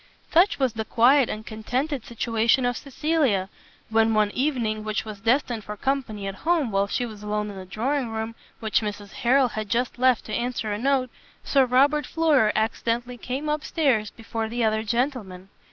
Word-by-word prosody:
Such 350 +4 +4
was 260 -5 +1
the 220 - -3
quiet 250 +4 +4
and 215 +1 -5
contented 250 +5 -3
situation 230 +2 +1
of 245 0 0
Cecilia, 275 - 0 0.4
when 225 0 +3
one 210 -1 +3
evening, 235 -6 -1
which 215 0 -2
was 215 -2 -7
destined 235 0 +1
for 210 +1 -7
company 250 -6 -2
at 195 - -3
home, 320 -8 +1
while 195 0 +1
she 245 - -1
was 215 -3 -9
alone 210 0 -2
in - - -10
the 190 -1 -8
drawing 250 +5 -1
room, 220 0 -4 0.3
which 220 0 +1
Mrs 205 -1 -5
Harrel 255 +1 +3
had 215 -2 -5
just 245 +3 -1
left 255 -2 +3
to 215 - -6
answer 235 -3 -2
a 205 - -3
note, 260 -1 +1 0.3
Sir 270 -2 +3
Robert 280 +4 +3
Floyer 300 -10 +3
accidentally 235 +2 -1
came 265 +6 -4
up 300 0 -1
stairs 255 -10 +1
before 225 -1 -5
the 240 +1 -1
other 220 0 +2
gentlemen. 220 -6 -2
230 Hz, 185 wpm, -25 LUFS, 215-265 Hz, 0.4 s, Such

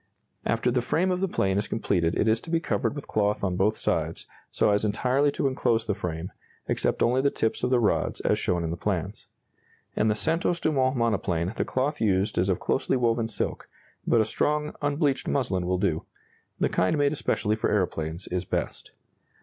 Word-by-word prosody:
] - - -49
After 115 +2 +1
the 125 0 +1
frame 175 +9 +1
of 180 0 -1
the 195 - +2
plane 95 - +1
is 105 - -3
completed 90 -6 0
it 110 - +1
is 110 +1 +2
to - - -9
be 165 0 +2
covered 160 - -1
with 145 - -7
cloth 105 -1 0
on 95 -2 0
both 105 +4 +2
sides, - - -1 0.2
so - - +2
as 100 +1 +2
entirely 125 +7 +2
to - - -2
enclose 120 -4 +1
the 105 - 0
frame, 90 -3 -4 0.4
except - - 0
only 125 +2 +3
the 140 - +3
tips 110 -4 -1
of 125 - +2
the 125 -1 +3
rods, 110 - +1
as - - +1
shown 90 -1 0
in 80 - -2
the 85 - -4
plans. - - -3 0.7
In 110 - +2
the 105 - +2
Santos 165 +6 0
Dumont 135 -5 +1
monoplane 100 -6 0
the - - -1
cloth 145 +4 -1
used 100 -3 +1
is 95 +2 +1
of 95 - +1
closely 135 - 0
woven 115 -2 +1
silk, 110 - -4 0.4
but 115 - +4
a - - +2
strong, 150 +4 0
unbleached 145 -1 0
muslin 95 -10 0
will 90 0 +1
do 80 -3 0 0.6
the - - +3
kind 95 - +1
made 145 0 +2
especially 110 -7 0
for 110 - -1
aeroplanes 85 -3 -1
is 90 0 -1
best. - - -3
110 Hz, 205 wpm, -26 LUFS, 95-140 Hz, 0.7 s, but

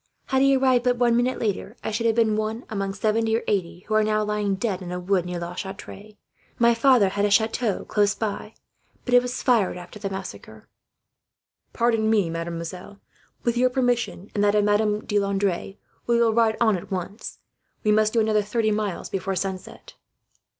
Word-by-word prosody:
Had 265 -1 +2
he 275 0 +5
arrived 260 -2 +3
but 250 -1 +2
one 240 -1 +3
minute 245 +2 +1
later, 210 +1 -3
I - - -2
should 225 +1 +1
be 230 - +5
one 215 +2 -2
among 195 -2 -3
seventy 220 +2 +1
or - - -5
eighty 175 -3 -1
who 215 - -5
are 215 0 +4
now 215 0 +1
lying 210 -1 -1
dead 195 -2 -2
in 175 -1 -7
a 180 - -3
wood, 180 -1 0
near 180 0 -4
La 170 +1 -5
Chatre. 200 +2 -8 0.4
My 235 0 +4
father 230 -4 +4
had 200 +1 -2
a 205 - +3
chateau 220 0 +1
close 205 -1 +1
by, 215 0 -4 0.5
but 245 - -2
it 245 - +7
was 250 0 -4
fired 220 -8 +2
after 180 +4 -10
the 200 -1 -3
massacre." 190 0 -8 1.1
"And 225 -2 +2
now, 205 -6 +2
mademoiselle, 170 +4 -6 0.4
with 235 -1 0
your 255 +1 +4
permission, 245 -6 -1
and 205 - 0
that 205 0 +3
of 210 - +3
Madame 210 0 +1
de 205 - +1
Landres, 195 -1 -1 0.3
we 235 0 +3
will 230 -1 +3
ride 225 -1 +2
on 220 -3 +3
at 180 - -7
once. 190 +3 -5 0.5
We 215 - +3
must 215 0 +3
do 230 - +3
another 215 -1 +2
thirty 215 +1 0
miles 210 -3 -2
before 195 0 -3
sunset." 190 0 -5
210 Hz, 190 wpm, -24 LUFS, 195-230 Hz, 1.1 s, it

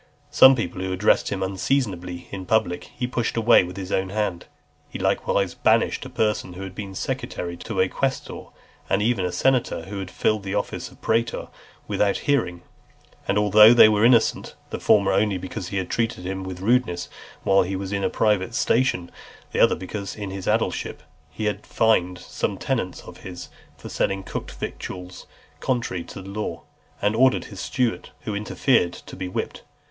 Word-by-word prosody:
Some 130 0 +8
people 90 -6 -3
who 95 0 -2
addressed 95 +3 +2
him 95 -2 -2
unseasonably 95 -3 -2
in 95 -2 -6
public, 110 -6 +1
he 125 - -5
pushed 120 -2 -2
away 115 -2 +6
with 90 +1 -7
his 95 -1 -6
own 95 0 0
hand. 95 -4 -2 0.4
He - - -6
likewise 100 -3 0
banished - - +2
a - - -11
person 105 -4 -1
who 95 +2 -7
had 95 -1 -7
been 95 -1 -7
secretary 85 -1 -4
to - - -5
a 95 - +4
quaestor, 135 +7 -3 0.4
and 100 - +2
even 115 -4 +1
a 90 - -1
senator 130 -6 +1
who 100 +3 -6
had 95 -2 -5
filled 110 +3 0
the 100 0 -4
office 100 - -3
of - - -20
praetor, 115 +1 0 0.4
without 100 -1 +1
a - - -9
hearing, 90 -12 0 0.6
and 100 - +1
although 105 +2 +7
they 115 - +9
were 105 0 +2
innocent; 115 -1 +3 0.2
the - - -3
former 100 -2 +4
only 100 0 +2
because 90 +1 -6
he 100 - -3
had 95 - -3
treated 115 -6 -1
him 95 +1 -3
with 95 -1 -7
rudeness 110 -5 +1 0.4
while 95 0 +4
he 95 +2 -2
was 95 0 -4
in 100 -1 -1
a - - +2
private 105 +1 +1
station, 125 -6 +2
and 85 - -15 0.4
the - - -2
other, - - +5
because 100 +1 -6
in 100 -3 -5
his 95 -1 -6
aedileship - - -1 0.3
he 110 +8 -5
had 105 - -1
fined 90 -5 +2
some - - -3
tenants - - -2
of - - -12
his, 90 -1 -9 0.3
for - - -10
selling 95 0 -1
cooked - - -5
victuals 90 0 -7 0.3
contrary 115 -9 -1
to 90 - -9
law, 100 +3 -5 0.4
and 105 +1 +2
ordered 130 +2 +3
his 95 - -9
steward, 125 +2 -1
who 105 - -4
interfered, 105 -2 +1
to - - -11
be 95 - -4
whipped. 90 - -4
100 Hz, 185 wpm, -24 LUFS, 95-110 Hz, 0.6 s, they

